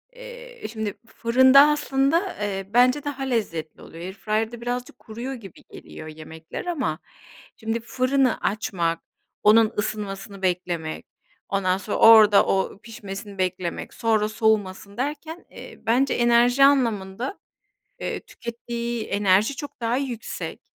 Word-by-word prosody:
eee, - - -11
şimdi 220 -3 -3
fırında 260 +3 +5
aslında, 300 +5 +1
eee, 195 -2 -3
bence 255 +4 +4
daha 280 -2 -4
lezzetli 205 -11 -3
oluyor. 165 - -11
Airfryer'da 215 +4 -3
birazcık 245 +1 -4
kuruyor 235 +5 -6
gibi 205 -8 -12
geliyor 155 - -10
yemekler. 160 - -9
Ama 260 - -2 0.6
şimdi 225 +1 -2
fırını 255 +2 +1
açmak, 175 -5 -1 0.4
onun 215 +1 +5
ısınmasını 200 -1 -4
beklemek, 175 -3 -2 0.4
ondan 190 -2 +1
sonra 200 +2 -4
orada 215 -3 +8
o 195 +1 -1
pişmesini 200 -2 -8
beklemek, 185 -1 -3
sonra 215 -2 +1
soğumasın 205 -3 0
derken, 300 +5 -4
eee, - - -11
bence 250 +4 +2
enerji 240 +2 +4
anlamında 235 - 0 0.6
eee, - - -3
tükettiği 235 -1 -5
enerji 200 +5 +2
çok 285 -2 -8
daha 230 +2 0
yüksek, 255 -5 -5
225 Hz, 120 wpm, -24 LUFS, 195-255 Hz, 0.6 s, orada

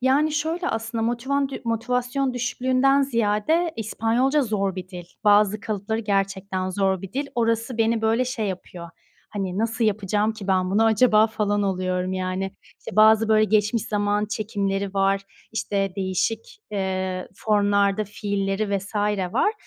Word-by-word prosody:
Yani, 280 +4 +2
şöyle 325 +4 -1
aslında, 225 0 -3
motivandü 265 +4 -1
motivasyon 250 +3 -1
düşüklüğünden 255 +3 +2
ziyade, 245 +7 +1
İspanyolca 235 +6 +1
zor 200 -5 -1
bir 185 0 -6
dil. 180 -2 -8 0.2
Bazı 205 0 +4
kalıpları 215 +1 -3
gerçekten 195 -2 -1
zor 190 -1 0
bir 195 - -8
dil. 280 +2 -2
Orası 230 0 0
beni 225 0 +2
böyle 225 +3 +2
şey 250 -4 -2
yapıyor. 180 -2 -6 0.4
Hani, 195 -2 -3
nasıl 230 +1 0
yapacağım 210 +1 +1
ki 215 -3 -9
ben 185 -1 +1
bunu 220 +3 +3
acaba, 220 -1 +5
falan 205 -2 -1
oluyorum 185 -1 -1
yani. 185 +1 -3 0.2
İşte, - - -9
bazı 220 +1 +6
böyle, 215 0 +5
geçmiş 215 +1 +1
zaman 205 0 0
çekimleri 200 -2 -2
var, 195 0 +2 0.3
işte, 200 -3 -1
değişik, 225 - -2
eee, 190 -2 -2
formlarda 205 0 +2
fiilleri 200 0 -2
vs. 200 +3 -11 0.4
var. 425 - +2
215 Hz, 140 wpm, -24 LUFS, 195-230 Hz, 0.4 s, bazı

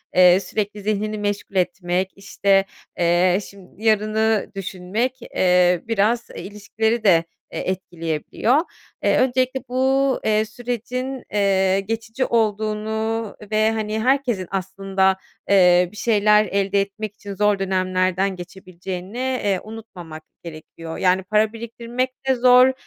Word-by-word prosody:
eee, 180 0 +7
sürekli 205 +1 -4
zihnini 215 +1 -1
meşgul 205 -1 -3
etmek, 180 0 0
işte, 195 0 +1 0.3
eee, 175 +2 +3
şim 195 -1 -17
yarını 215 0 +1
düşünmek, 195 +7 -3
eee, 180 -4 +2
biraz, 225 +2 +1
e, - - -7
ilişkileri 215 +3 -2
de, 170 -5 +5 0.3
e, - - -4
etkileyebiliyor. 175 - -1 0.5
Eee, - - +3
öncelikle 255 +1 +1
bu, 265 +1 +2
eee, 215 0 +2
sürecin, 245 +3 -5
eee, 195 -2 +2
geçici 225 +5 -3
olduğunu 220 0 -1 0.2
ve 215 +1 +3
hani, 220 0 -2
herkesin 250 -8 +1
aslında, 190 0 0 0.3
eee, 180 -2 +5
bir 210 - -14
şeyler 210 -1 +3
elde 200 0 +1
etmek 200 +1 -5
için 200 -1 -8
zor 210 0 +2
dönemlerden 185 0 0
geçebileceğini, 185 +2 -8
eee, 250 -7 0
unutmamak 180 -8 -10 0.2
gerekiyor. 165 0 -9
Yani, 185 0 +2
para 215 +2 +1
biriktirmek 235 +2 -3 0.2
de 265 - +3
zor. 250 +1 +6
205 Hz, 120 wpm, -21 LUFS, 185-225 Hz, 0.5 s, eee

